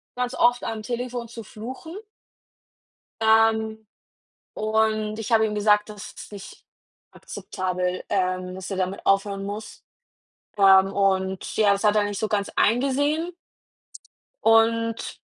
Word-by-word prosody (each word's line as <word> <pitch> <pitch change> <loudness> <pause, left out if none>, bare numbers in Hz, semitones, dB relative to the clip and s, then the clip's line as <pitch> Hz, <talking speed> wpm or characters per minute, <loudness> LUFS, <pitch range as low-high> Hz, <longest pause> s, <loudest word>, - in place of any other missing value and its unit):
ganz 250 0 -2
oft 245 0 +3
am 220 -1 -4
Telefon 245 +1 -4
zu 230 0 -9
fluchen. 255 - -9 1.3
Ähm, 220 0 +2 0.7
und 215 0 0
ich 225 +2 -4
habe 220 -1 +5
ihm 210 - -3
gesagt, 210 0 +3
das 210 -1 -9
ist - - -11
nicht 200 -1 -11 0.5
akzeptabel, 180 0 -4
ähm, 185 -2 -1
dass 190 +1 -7
er 195 - -3
damit 185 +1 -3
aufhören 195 0 +1
muss. 205 +2 -7 0.8
Ähm, 195 -1 +6
und, 190 -1 0
ja, 205 -2 +5
das 200 - -3
hat 210 -1 +4
er 210 - +4
nicht 205 -1 -3
so 220 - 0
ganz 205 -1 -1
eingesehen. 285 +8 +1 1.1
Und 230 0 +2
215 Hz, 130 wpm, -24 LUFS, 195-225 Hz, 1.3 s, Ähm